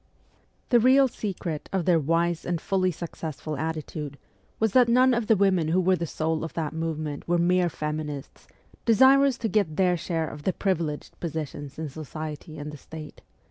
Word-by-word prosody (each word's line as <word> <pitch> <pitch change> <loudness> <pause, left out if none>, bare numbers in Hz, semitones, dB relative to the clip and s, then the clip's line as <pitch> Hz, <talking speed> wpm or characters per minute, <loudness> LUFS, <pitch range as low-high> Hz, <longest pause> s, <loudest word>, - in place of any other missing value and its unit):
The 240 - +6
real 265 +3 +6
secret 180 - -5
of 190 -4 0
their 175 -3 +4
wise 165 +2 +1
and 175 -2 -1
fully 185 +1 +1
successful 160 -2 -5
attitude 155 -1 -4 0.4
was 220 -2 +1
that 250 -2 +5
none 255 +2 +5
of 235 -2 0
the 225 - +5
women 185 -5 +2
who 170 +4 +2
were 185 0 +3
the 170 -1 -3
soul 160 +1 -1
of 165 - -6
that 160 -2 -2
movement 155 -2 -4
were 175 0 +2
mere 175 +1 +3
'feminists,' 150 -2 -5 0.4
desirous 265 +3 +5
to 230 - -2
get 200 -8 +1
their 180 -2 +3
share 165 -2 -2
of 150 - -8
the 185 +5 0
privileged 165 -6 -2
positions 155 -3 -5
in 160 0 -3
society 155 +1 -7
and 150 0 -6
the 150 - -9
State. 155 +2 -10
165 Hz, 180 wpm, -26 LUFS, 155-190 Hz, 0.4 s, The